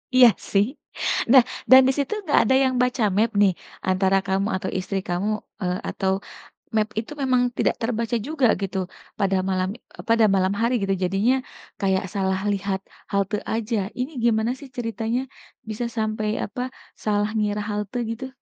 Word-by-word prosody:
Iya, 250 -1 +9 0.2
sih. 200 0 +4 0.7
Nah, 260 -3 +9 0.3
dan 260 0 +11
di - - +4
situ 285 +9 0
nggak 300 - +3
ada 265 - +4
yang 260 -1 +1
baca 250 -2 +1
map, 225 +1 +3
nih, 195 -3 +5 0.4
antara 190 +1 +3
kamu 195 +1 +1
atau 190 0 -3
istri 195 +1 -3
kamu? 180 +4 -1 0.3
Eee, 180 -1 0
atau 190 0 -1 0.6
map 215 -1 +3
itu 225 - -7
memang 255 -2 +3 0.2
tidak - - +2
terbaca 230 0 -1
juga 295 -5 +2
gitu 195 0 -3 0.4
pada 195 -2 +2
malam 185 0 0
e - - -14
pada 230 -1 +5
malam 190 0 +2
hari, 235 +2 +2
gitu? 195 0 +1
Jadinya, 195 +8 +2 0.5
kayak 190 -1 +1
salah 190 -1 0
lihat 195 -1 -1 0.3
halte 200 +1 0 0.2
aja? 225 0 -1 0.2
Ini 255 +5 -2
gimana 225 0 +2
sih 280 - -10
ceritanya 230 +1 -1 0.5
bisa 220 +3 -3
sampai, 215 -1 -1 0.2
apa, 225 +5 -5 0.4
salah 210 0 +1
ngira 210 -1 0
halte 210 +3 -3
gitu? 255 +3 -5
215 Hz, 165 wpm, -24 LUFS, 195-240 Hz, 0.7 s, dan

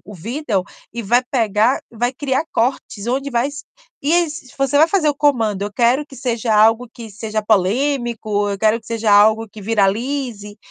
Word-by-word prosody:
o 205 +2 -11
vídeo 225 - -2 0.3
e 235 - -4
vai 240 +5 +2
pegar 225 0 +2
e - - -15
vai 240 +3 0
criar 270 +2 -1
cortes 230 -3 -2
onde 275 +3 -1
vai 240 +3 0
s 290 +2 -9 0.4
e 290 +4 +1
esses 330 -6 -1
você 275 +1 +1
vai 315 - +6
fazer 340 -4 +2
o - - -4
comando: 225 -9 +1
"Eu 205 - -4
quero 245 +6 +2
que 275 - -14
seja 235 -3 -1
algo 225 +3 +4
que 230 -2 -10
seja 215 +1 -4
polêmico", 220 0 0
"Eu 200 - -3
quero 220 +2 +2
que - - -24
seja 225 -2 -1
algo 215 +2 +4
que 210 +1 -12
viralize". 220 +1 -1
235 Hz, 190 wpm, -19 LUFS, 215-270 Hz, 0.4 s, vai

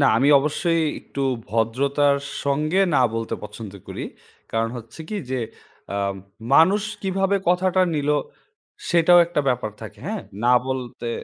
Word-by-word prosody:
না, 140 - +5
আমি 135 +5 +3
অবশ্যই 165 +3 0 0.2
একটু 140 - -6 0.3
ভদ্রতার 140 +6 +2 0.3
সঙ্গে 155 +6 +1
না - - +4
বলতে 115 0 -2
পছন্দ 105 0 -8
করি। - - -5 0.5
কারণ 115 0 +1
হচ্ছে 115 +5 -10
কি 215 - -3
যে 130 - -1 0.5
আম 100 -1 -1 0.4
মানুষ 190 +7 +5 0.2
কিভাবে 195 +1 +1
কথাটা 185 +1 +3
নিলো 150 0 +1 0.7
সেটাও 175 +1 +6
একটা 170 -3 0
ব্যাপার 125 -4 0
থাকে, 105 -1 -9
হ্যাঁ। 215 +1 -3 0.2
না 125 - +5
বলতে 125 -2 -4
140 Hz, 140 wpm, -23 LUFS, 115-175 Hz, 0.7 s, সেটাও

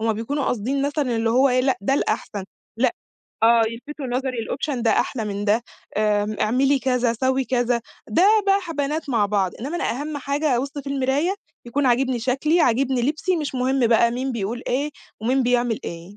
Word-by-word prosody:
هُم 225 0 +1
بيكونوا 265 +7 -2
قاصدين 260 +5 -1
مثلًا 285 -4 0
اللي 225 0 +1
هو 260 +4 +4
إيه 255 0 +3
لأ 260 0 +1
ده 240 +7 +1
الأحسن، 205 -7 -2 0.3
لأ 255 +9 +2 0.5
آه 230 0 +6
يلْفِتُوا 270 +5 -7
نظري، 255 +2 -2
الoption 255 +3 -3
ده 225 - +3
أحلى 225 +1 0
من 205 -1 -3
ده، 220 +3 +2 0.3
آمم، 210 0 +1
اعملي 270 +5 +3
كذا 250 -3 +1
سوّي 260 0 +1
كذا، 245 -1 +1 0.3
ده 220 +11 +2 0.2
بقي 395 0 +4
ح 350 -4 -6
بنات 295 +1 -2
مع 220 -5 +2
بعض، 195 -3 0
انما 285 +8 -3
أنا - - -1
أهم 290 +4 -4
حاجة 280 -1 0
أبُص 275 +3 -2
في 285 - -8
المرايا 275 +6 0 0.3
يكون 270 +4 0
عاجبني 255 0 +2
شكلي، 270 +8 +1
عاجبني 260 -2 +2
لِبسي، 315 +7 0
مش 295 -4 -3
مهم 255 0 +2
بقي 235 0 +4
مين 255 +2 -2
بيقول 230 +2 -3
إيه 280 +4 0 0.3
ومين 255 +4 +1
بيعمل 240 -2 +1
إيه. 170 +4 -8
255 Hz, 190 wpm, -23 LUFS, 230-280 Hz, 0.5 s, آه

